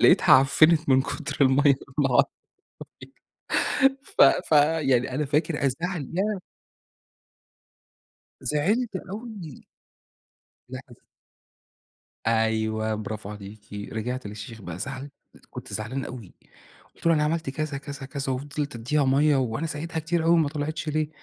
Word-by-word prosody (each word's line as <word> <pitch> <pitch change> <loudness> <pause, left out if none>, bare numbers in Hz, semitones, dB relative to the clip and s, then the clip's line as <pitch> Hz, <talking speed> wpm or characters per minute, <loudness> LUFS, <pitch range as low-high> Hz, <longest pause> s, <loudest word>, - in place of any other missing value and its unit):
لقيتها - - +6
عفّنت 155 +4 +5
من 130 0 +5
كتر - - -5
المَيّة 140 +2 +5 0.2
والله 135 -1 +4 1.6
أعلم 270 0 +5
ف - - 0
ف 140 - +5 0.4
يعني 125 0 +2
أنا 150 +2 0
فاكر 150 +1 0
الزعل، 150 +3 -2
ياه! 200 0 0 2.0
زعلت 205 +9 0
أوي. 205 - -8 1.0
لأ 130 0 -6
از 120 - -14 1.3
أيوه 110 -1 +1
برافو 110 -1 -5
عليكِ 105 0 -11 0.2
رجعت 125 +2 -3
للشيخ 105 +2 -8
بقى 90 -2 -7
زعل 135 +5 -6 0.4
كنت - - -9
زعلان 120 +5 -3
أوي 120 -7 -9 0.6
قُلت - - -9
له 165 - +6
أنا 150 -1 +2
عملت 160 -1 -1
كذا، 155 0 -3
كذا، 140 0 -8
كذا، 135 -1 -3
وفضلت 145 +2 -4
أدّيها 140 +6 0
مَيّة 140 +2 +4
وأنا 130 +4 -1
سقيتها 160 +1 -4
كتير 165 +1 -1
أوي 165 - +4
وما 160 -3 +3
طلعتش 155 +1 -4
ليه؟ 155 0 0
140 Hz, 125 wpm, -25 LUFS, 125-155 Hz, 2.0 s, لقيتها